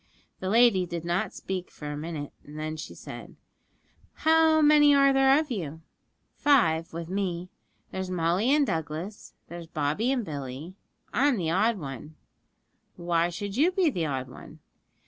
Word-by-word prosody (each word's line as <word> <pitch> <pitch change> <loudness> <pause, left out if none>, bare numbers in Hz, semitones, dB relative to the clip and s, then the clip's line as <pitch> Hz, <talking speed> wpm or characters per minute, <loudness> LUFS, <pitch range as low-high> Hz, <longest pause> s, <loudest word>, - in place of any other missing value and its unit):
The 185 - -3
lady 220 -4 +4
did 170 -1 -5
not 175 +2 -1
speak 185 -1 -5
for 150 -1 -7
a - - -4
minute, 150 -1 -6
then 155 +1 -6
she 155 - -8
said, - - -10 0.8
'How 320 0 +4
many 295 -1 +6
are 275 0 +5
there 270 +1 +5
of 310 -3 -4
you?' 160 -7 -5 0.5
'Five 165 - +3
with 165 0 -6
me; 185 -2 -3 0.4
there's 190 -1 -4
Molly 180 +5 +1
and 290 0 +4
Douglas, 165 - -5
and - - -41
there's 170 -1 -8
Bobby 155 - -1
and 250 -5 -1
Billy 145 +2 -6 0.4
I'm 275 -1 +3
the 165 -4 -1
odd 215 +5 +2
one.' 145 -1 -8 0.8
'Why 170 0 0
should 195 +3 -5
you 320 +6 +4
be 365 -4 +2
the 170 -8 -2
odd 130 -2 -3
one?' 125 - -12
180 Hz, 160 wpm, -27 LUFS, 160-250 Hz, 0.8 s, many